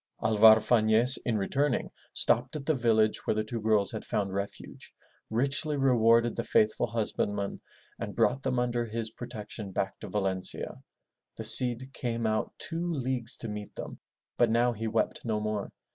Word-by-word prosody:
'* - - -15
Alvar 110 0 +6
Fafiez, 110 +2 +4
in 115 -3 0
returning, 135 +7 -1 0.2
stopped - - +1
at 145 -2 -6
the 155 - +1
village 110 -4 +1
where - - +1
the 110 - -1
two 115 +1 -6
girls 105 -2 +1
had 110 - -6
found 100 -2 -3
refuge, 100 +1 -7 0.4
richly 140 +6 +1
rewarded 115 -3 +3
the 115 - -3
faithful 110 +2 +1
husband 110 -2 -2
man, 100 -1 -5 0.4
and - - -6
brought 135 +2 +1
them 130 -2 -2
under 120 -1 -1
his 115 0 -4
protection 110 -4 -8
back 95 +1 -3
to - - -8
Valencia. 95 -3 -3 0.6
The - - -6
Cid 125 +1 +7
came 115 -2 -3
out 110 0 -1
two 170 +1 -4
leagues 130 -5 -2
to 115 - -6
meet 105 -1 -8
them, - - -8 0.4
but 120 - +4
now 120 +2 +1
he 115 0 -5
wept 110 +1 -2
no 110 -2 -2
more. 105 -1 -4
115 Hz, 175 wpm, -28 LUFS, 110-125 Hz, 0.6 s, Cid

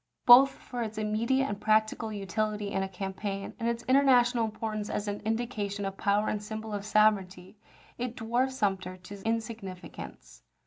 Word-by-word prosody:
Both 255 +3 +9
for 245 -1 -7
its 220 -2 -4
immediate 225 +5 +1
and 205 -5 -4
practical 215 +1 +1
utility 210 +1 -2
in 195 - 0
a 195 - -2
campaign, 195 +1 -5
and 230 0 0
its 235 0 -3
international 250 -3 +4
importance 215 -1 -4
as 210 - -3
an 205 0 -3
indication 220 -3 -2
of 195 0 -4
power 205 +2 +1
and 210 - -1
symbol 220 +1 -6
of 205 0 -4
sovereignty, 195 -4 +2 0.4
it 245 -1 -3
dwarfed 245 +3 0
Sumter 190 -6 -1
to 195 +2 -11
insignificance. 225 -5 -5
215 Hz, 160 wpm, -29 LUFS, 200-230 Hz, 0.4 s, Both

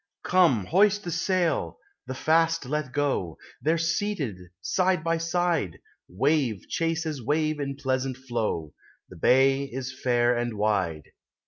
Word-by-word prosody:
Come, 165 - +3
hoist 205 - +3
the 175 - -4
sail, 170 - 0 0.3
the 130 - -4
fast 165 +1 +2
let 150 0 -2
go! 135 - -1 0.2
They're 160 +2 +2
seated 170 - -1 0.2
side 185 - +1
by 165 0 0
side; 165 - 0 0.3
Wave 130 - 0
chases 165 -4 -2
wave 155 +3 0
in 140 -1 -3
pleasant 130 -2 -2
flow; 115 - -3 0.4
The - - -12
bay 135 +2 +4
is 130 -1 -6
fair 120 -1 +2
and 120 -2 -2
wide. 95 -7 0
140 Hz, 130 wpm, -26 LUFS, 120-165 Hz, 0.4 s, bay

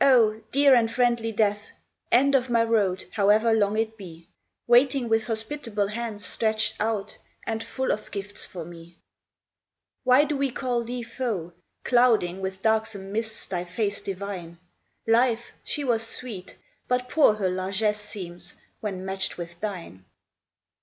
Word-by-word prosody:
H, 225 -5 +5
dear 280 0 +6
and 230 -2 +4
friendly 235 -2 +1
Death, 210 -1 0 0.4
End 275 +4 +5
of 260 -2 +2
my 230 -1 +4
road, 205 -5 +1
however 215 +2 +4
long 210 -1 +2
it 220 0 -1
be, 170 -4 -11 0.4
Waiting 250 +1 +4
with 225 -1 +1
hospitable 225 -2 -2
hands 215 -2 -4
stretched 220 +1 0
out 215 -1 -2 0.3
And 225 0 -2
full 260 +3 -2
of 215 - -3
gifts 205 0 -3
for 175 -4 -7
me! 170 0 -12 1.1
Why 255 +3 +6
do 300 0 -1
we 275 0 +1
call 245 -1 -1
thee 245 +1 -4
foe, 225 -8 -3 0.3
Clouding 225 -7 +3
with 190 0 -5
darksome 220 -3 0
mists 220 +1 -3
thy 175 -2 -3
face 200 +3 -1
divine? 190 -3 -6 0.5
Life, 235 0 +2
she 290 - -3
was 235 -4 +1
sweet, 225 -4 -5 0.3
but 250 0 0
poor 285 -8 +4
her 190 -3 0
largess 200 +3 0
seems 180 -3 -7 0.2
When 190 -3 -4
matched 190 0 -2
with 170 0 -7
thine. 175 - -6
220 Hz, 145 wpm, -26 LUFS, 195-235 Hz, 1.1 s, dear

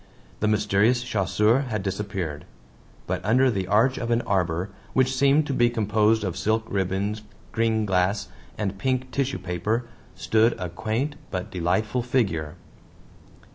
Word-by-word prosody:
The 105 - +1
mysterious 110 +3 +2
chasseur 105 +2 +2
had 105 -4 -2
disappeared. 95 -6 -4 0.6
But - - -3
under 130 +4 +4
the 95 -4 -2
arch 110 +6 +3
of 115 - -3
an 120 0 +2
arbor, 90 -3 0 0.2
which 130 0 +2
seemed 140 +3 +4
to 140 - -2
be 120 -2 +3
composed 110 -1 +2
of 95 -4 -2
silk 110 +1 0
ribbons, 100 +2 -1 0.3
green 115 -1 +1
glass, 95 +1 +1 0.3
and 100 -2 -3
pink 130 +2 -1
tissue 140 0 -1
paper, 95 +7 -2 0.3
stood 110 +2 +2
a 90 - -3
quaint 115 - -2
but 90 -1 -4
delightful 95 +8 0
figure. 100 - -1
110 Hz, 140 wpm, -25 LUFS, 95-120 Hz, 0.6 s, under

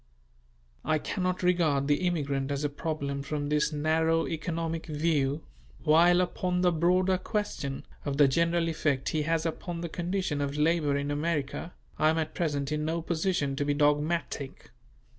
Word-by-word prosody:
I 155 - +2
cannot 185 +4 -2
regard 160 -6 +2
the 150 +5 +2
immigrant 140 -5 -1
as 140 0 -2
a 145 - +1
problem 140 -2 -3
from 145 0 -3
this 150 +1 +2
narrow 160 +2 +1
economic 165 0 -3
view: 150 -2 0 0.4
while 170 +3 +5
upon 180 0 -1
the 180 -1 +4
broader 180 +3 +2
question, 185 -9 -3 0.2
of 140 -1 -2
the 145 -1 +7
general 170 +4 +2
effect 150 -4 0
he 155 - 0
has 165 +1 0
upon 170 +1 -4
the 170 - -4
condition 175 -3 -2
of 140 0 -2
labour 150 -2 +2
in 140 +1 -2
America, 150 +2 -2 0.2
I 155 - +5
am 160 - +1
at 160 -1 -2
present 145 -4 -1
in 150 0 -1
no 165 +1 -1
position 165 -4 0
to 145 - +1
be 145 0 0
dogmatic. 150 -1 0
155 Hz, 160 wpm, -29 LUFS, 145-170 Hz, 0.4 s, the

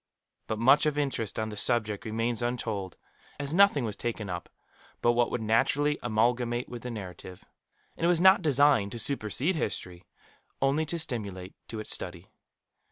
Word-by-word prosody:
But 110 - -2
much 135 +7 +5
of 150 -1 -1
interest 135 -7 -2
on 110 0 -2
the 105 - -7
subject 110 -2 +1
remains 115 +1 -1
untold, 110 -6 -3 0.4
as 145 +1 -3
nothing 180 -8 +4
was 105 -3 -4
taken 110 -4 -4
up 85 -2 -6 0.5
but 120 - +3
what 120 0 +2
would 115 - -3
naturally 145 +7 +2
amalgamate 120 +1 0
with 120 -1 -8
the 125 - -6
narrative 95 -4 -9 0.5
and - - -7
it - - +4
was 175 -2 +3
not 190 +2 +6
designed 140 -8 +3
to - - -5
supersede 130 - 0
history, 90 - -4 0.5
only 140 +4 +1
to 170 - -2
stimulate 100 - -4
to 110 - -6
its 110 - 0
study. 90 0 -3
120 Hz, 165 wpm, -28 LUFS, 105-140 Hz, 0.5 s, not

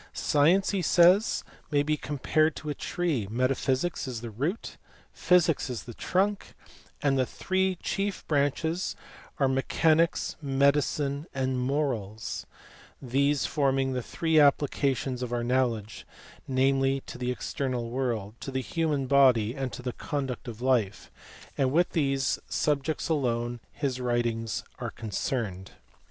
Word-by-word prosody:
Science, 165 +7 +3
he 195 -2 0
says, 180 +6 +4 0.3
may 145 -2 +2
be 155 +1 +1
compared 150 +2 0
to 150 0 -5
a - - -1
tree, 150 - -2
metaphysics 130 +6 0
is 120 -4 -5
the 120 -1 -6
root, 145 - -3 0.4
physics 175 -6 +3
is 115 -6 -4
the 120 - -9
trunk, 195 - -1 0.5
and 135 -2 +2
the 130 - +3
three 190 0 0
chief 195 0 -2
branches 160 +4 0 0.4
are 135 - +3
me 135 0 +1
chanics, 165 +4 +2
medicine, 140 +1 +1
and 130 -1 0
moi*als, 125 -6 -2 0.5
these 140 +3 +1
forming 135 -2 +1
the 125 - -1
three 160 +6 0
applica 140 -2 +3
tions 130 -1 -4
of 125 -1 -3
our 120 -1 -1
knowledge, 120 -4 -1 0.4
namely, 135 +1 +2
to 125 - -9
the 125 0 -2
external 125 -2 -3
world, 120 -5 -2
to - - -6
the 130 0 -2
human 150 0 -1
body, 125 -5 +4
and 135 -2 -3
to 125 - -8
the 125 -1 -3
conduct 135 -3 -4
of 120 0 -7
life: 115 -6 0 0.5
and 130 -2 +2
with 175 +4 +2
these 135 -4 +1
sub 145 -2 +1
jects 155 +1 -2
alone 120 -6 -1
his 130 -3 -3
writings 120 -3 -1 0.2
are - - -3
concerned. 105 -3 -4
135 Hz, 145 wpm, -28 LUFS, 125-150 Hz, 0.5 s, says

